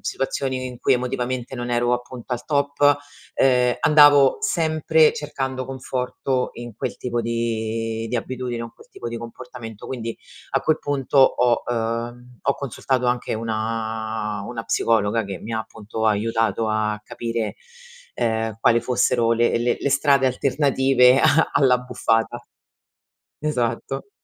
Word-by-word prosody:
situazioni 130 -1 -2
in 125 -1 -8
cui 135 - +3
emotivamente 125 0 -3
non 120 -1 -4
ero, 120 0 +1
appunto, 125 0 -4
al 120 0 -3
top, 140 -1 -1 0.6
uhm, 125 -2 +3
andavo 145 - +6
sempre 160 - +3
cercando 130 -3 -4
conforto 130 0 -2
in 120 -2 -8
quel - - -4
tipo 120 -1 -2
di 115 -1 -2
di 125 - -1
abitudine 125 +1 -4
con 115 0 -7
quel - - -18
tipo - - -8
di 115 0 -5
comportamento. 115 -2 -9
Quindi, 115 -3 -5 0.3
a 135 - +1
quel 155 +1 +2
punto 140 -1 -1
ho, 125 -2 +4
ehm, 120 +1 -4
ho 140 - +1
consultato 130 -1 -2
anche 120 -2 0
una 110 -1 -3
una 115 -2 -5
psicologa 110 0 +1
che 100 -1 -6
mi 115 - -7
ha, 110 - -1
appunto, 110 0 -5
aiutato 115 +1 +1
a 105 0 -1
capire, 115 -2 -3 0.6
ehm, 115 - 0 0.3
quale 115 0 +4
fossero 120 -2 +1
le 120 0 +2
le 120 0 +1
le 140 - -1
strade 140 -1 +3
alternative 130 -1 +3
a 160 +4 +4
all'abbuffata. 125 -3 +1 1.0
Esatto. 135 - -2
120 Hz, 135 wpm, -22 LUFS, 115-130 Hz, 1.0 s, andavo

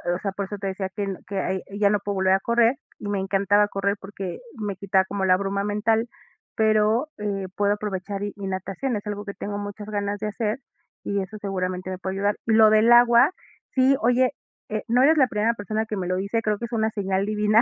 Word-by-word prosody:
o - - -4
sea, 200 - -2
por 200 0 -3
eso 205 +2 -6
te 195 - -3
decía 190 0 -3
que 205 - -2
el 195 -2 -3
que 195 0 -3
ay 190 0 -1 0.2
ya 205 -1 +4
no 210 - +3
puedo 205 0 -3
volver 190 0 +3
a 195 - +3
correr 235 +3 +3 0.2
y - - -6
me 200 - 0
encantaba 200 +2 +2
correr 200 0 -1
porque 195 -2 -6 0.2
me 205 -2 -3
quitaba 190 0 +1
como 195 0 -2
la 185 -1 +5
bruma 200 0 -1
mental, 220 +3 +1 0.5
pero, 220 +5 +2
eh, 200 -2 -2
puedo 205 0 +2
aprovechar 200 -1 -4
y 205 - -3
y 200 - -7
natación, 195 +7 -3
es 205 - -5
algo 205 0 -4
que 200 - -5
tengo 205 0 -4
muchas 205 +1 -7
ganas 205 -1 -2
de 215 - -2
hacer 215 +3 -2 0.4
y 200 -1 -1
eso 205 +3 -7
seguramente 185 -2 -3
me 185 - -4
puede 190 0 -4
ayudar. 205 +1 +1
Lo 220 -1 +6
del 215 +2 +5
agua, 240 +3 +7 0.4
sí, 260 +1 +5
oye 250 +2 +3 0.4
eh, 215 0 -2
no 245 +2 +4
eres 310 +4 +5
la 265 -3 +5
primera 220 +1 +1
persona 215 0 -3
que 215 - -4
me 185 -3 -3
lo 185 - 0
dice, 200 +4 -1
creo 215 -1 0
que 235 - -4
es 235 - -10
una 220 -1 +1
señal 195 -2 -1
divina, 210 +1 +3
205 Hz, 235 wpm, -24 LUFS, 195-220 Hz, 0.5 s, agua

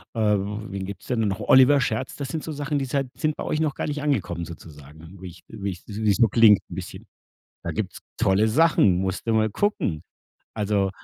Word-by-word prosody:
äh, - - -3 0.2
wen 100 -1 -5
gibt's 100 -1 -9
denn 115 -4 0
noch. 95 -2 -2
Oliver 130 +2 +6
Scherz. 125 0 -2
Das 140 -3 -5
sind 160 +1 -4
so 160 - -5
Sachen, 145 0 -2
die 135 - -2
seid 135 0 -1
sind 155 -1 -1
bei - - -5
euch 155 - -1
noch 155 -3 0
gar - - -3
nicht 150 0 -3
angekommen 120 - -1
sozusagen, 80 +2 -13
wie 95 - -7
ich 85 0 -12
wie 100 -3 -5
ich 90 - -11
wie's 105 0 0
so 115 -2 +5
klingt 110 -1 +6
'n - - -8
bisschen. - - -8 0.6
Da - - -3
gibt's - - -4 0.2
tolle 100 +3 +3
Sachen, 110 - +4
musst 95 +1 -3
du 115 - +2
mal 110 0 +2
gucken. 100 - -1 0.5
Also 100 -2 0
110 Hz, 210 wpm, -24 LUFS, 95-135 Hz, 0.6 s, Oliver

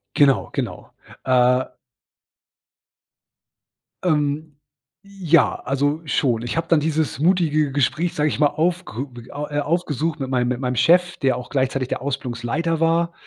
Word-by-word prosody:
Genau, 135 - +3
genau. - - -5 0.3
Äh 125 0 +3 2.4
Ähm, 150 -2 0 0.5
ja, 180 -6 +2
also, 145 +4 -1
schon. 120 -6 0
Ich 120 - -4
habe 165 0 -1
dann 165 -3 +5
dieses 155 -1 -1
mutige 155 -4 +2
Gespräch, 155 +5 0
sage 150 0 +1
ich - - -4
mal, 150 - +5
aufge 155 - -2 0.2
a 145 +1 -5
äh, 145 - 0
aufgesucht 160 -1 -1
mit 130 - -3
meinem 125 -2 +1
mit 125 0 -2
meinem 125 -1 -1
Chef, 175 +7 +3
der 130 -2 +1
auch 125 - -8
gleichzeitig 130 -1 -1
der - - -3
Ausbildungsleiter 135 +4 -2
war 170 +1 +1
145 Hz, 140 wpm, -21 LUFS, 130-165 Hz, 2.4 s, dann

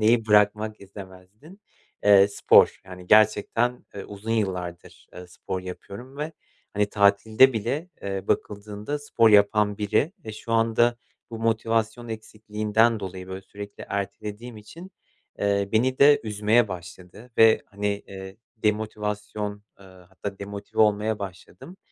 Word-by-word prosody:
neyi 115 +1 +3
bırakmak 105 0 +2
istemezdin? 100 - -13 0.4
Eee, 100 -1 +7
spor. 100 - +4
Yani 90 -1 -11
gerçekten, 110 +3 +3
eee, 100 - -7
uzun 105 +2 -8
yıllardır, 90 -5 -3
eee, 90 - -10
spor 90 +1 -6
yapıyorum 100 +8 -10
ve 155 +2 -4 0.4
hani 105 0 +2
tatilde 110 +6 +4
bile, 120 - -3
eee, 95 -1 -4
bakıldığında 105 +6 -3
spor 115 -6 +2
yapan 105 0 +4
biri 110 - 0
ve 110 - -6
şu 110 +2 -7
anda 115 +1 +2 0.3
bu 115 - -6
motivasyon 115 +1 -1
eksikliğinden 110 0 0
dolayı, 95 -1 -7
böyle, 95 0 -6
sürekli 100 +1 -10
ertelediğim 105 +4 -5
için, 165 - -12 0.5
eee, 100 -1 0
beni 130 +4 +1
de 145 +1 +6
üzmeye 105 +2 +2
başladı 90 +5 -10
ve 115 0 +6
hani, 100 0 -5 0.2
eee, 95 0 -9 0.2
demotivasyon, 105 -1 -3 0.2
eee, - - -15
hatta 95 +2 -9
demotive 100 +1 -5
olmaya 105 0 +1
başladım 95 - -10
105 Hz, 130 wpm, -25 LUFS, 100-115 Hz, 0.5 s, Eee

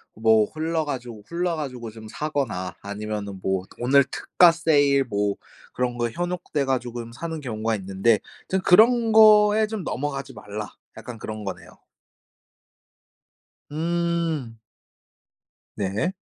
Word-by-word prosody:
뭐 110 -1 +4
홀라 160 +1 -1
가지고 120 -6 -6
홀려 175 0 0
가지고 125 -7 -5
좀 110 0 -11
사거나 135 -13 -3
아니면은 100 -1 -5
뭐 95 -1 -1 0.2
오늘 135 +3 +5
특가 175 +5 +4
세일 145 -5 +3
뭐 100 -3 -1 0.4
그런 125 -1 -2
거에 120 -1 -1
현혹돼 175 -3 -2
가지고 120 -2 -2
음 115 0 -7
사는 160 +5 -5
경우가 115 -4 -2
있는데 100 +3 +1 0.3
좀 190 - +1
"그런 225 +5 +5
거에 215 0 +7
좀 215 -3 -5
넘어가지 135 0 -4
말라." 105 +1 -7 0.2
약간 115 +1 -8
그런 110 0 -6
거네요. 95 - -8 1.9
응. 165 -6 -1 1.2
네. 100 - -1
130 Hz, 245 characters per minute, -24 LUFS, 110-165 Hz, 1.9 s, 거에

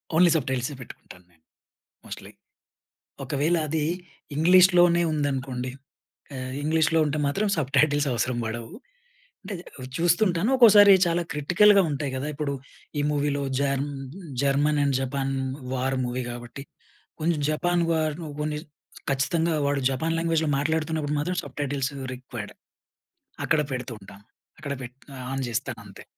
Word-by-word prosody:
Only 175 +2 +6
సబ్‌టైటిల్సే 130 -1 -2
పెట్టుకుంటాను 90 -6 -13
నేను. 80 -2 -31 0.6
Mostly. - - -9 0.9
ఒకవేళ 150 +5 +1
అది 155 0 -1 0.5
ఇంగ్లీష్‌లోనే 175 +1 +6
ఉందనుకోండి. 130 -4 -2 0.6
ఆహ్, 130 0 -5
ఇంగ్లీష్‌లొ 160 +1 +2
ఉంటే 150 +1 -1
మాత్రం 200 +10 0
సబ్‌టైటిల్స్ 145 0 +2
అవసరం 120 +1 -1
బడవు. 115 +4 -5 0.7
అంటే 205 - -6 0.2
అది 130 -1 -7
చూస్తుంటాను 175 +4 +2
ఒక్కోసారి 210 -5 +8
చాలా 170 0 +1
క్రిటికల్‌గా 195 +7 +5
ఉంటాయి 140 -1 -2
కదా! 130 +3 -3
ఇప్పుడు 145 -1 -2 0.5
ఈ - - +2
మూవీలో 145 -1 0 0.2
germ 140 0 0 0.5
German 145 +2 +2
and 140 -2 +1
Japan 135 +1 -2 0.4
war 130 +1 -1
movie 125 +1 -3
కాబట్టి 120 +3 -8 0.6
కొంచెం 165 0 +1
జపాన్ 175 +3 +1
వార్ 155 -2 +1 0.3
కొన్ని 150 0 -2 0.5
ఖచ్చితంగా 160 +5 +1
వాడు 140 0 +1
జపాన్ 160 +5 -1
లాంగ్వేజ్‌లొ 165 -2 +1
మాట్లాడుతున్నప్పుడు 155 0 -1
మాత్రం 180 +5 -1
సబ్‌టైటిల్స్ 140 0 -3 0.2
రిక్వైర్డ్. 125 -4 -8 0.9
అక్కడ 155 - +2
పెడుతూ 125 0 -4
ఉంటాను. 100 +1 -14 0.3
అక్కడ 145 -2 -4
పెట్ 125 +1 -9 0.2
ఆహ్, 130 - -7
ఆన్ 135 0 -2
జెస్తానంతే. 110 -4 -5
145 Hz, 125 wpm, -25 LUFS, 130-160 Hz, 0.9 s, ఒక్కోసారి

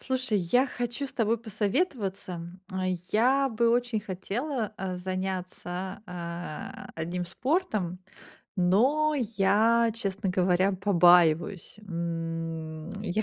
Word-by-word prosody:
Слушай, 255 -5 0
я 245 +10 +3
хочу 245 +2 -3
с - - -9
тобой 230 0 +1
посоветоваться. 205 - -2 0.7
Я 265 +5 +4
бы 235 0 +2
очень 240 -2 +1
хотела, 215 +5 -3
э, 185 -1 -3
заняться, 185 0 -4
э, 170 -2 -6
одним 175 +2 -3
спортом, 215 - -1 0.6
но 255 +13 +3 0.2
я, 220 +4 +4
честно 195 -3 -2
говоря, 185 +1 +3
побаиваюсь. 180 -1 +4
М, 165 -2 -4
я 215 +1 0
195 Hz, 100 wpm, -28 LUFS, 180-235 Hz, 0.7 s, Я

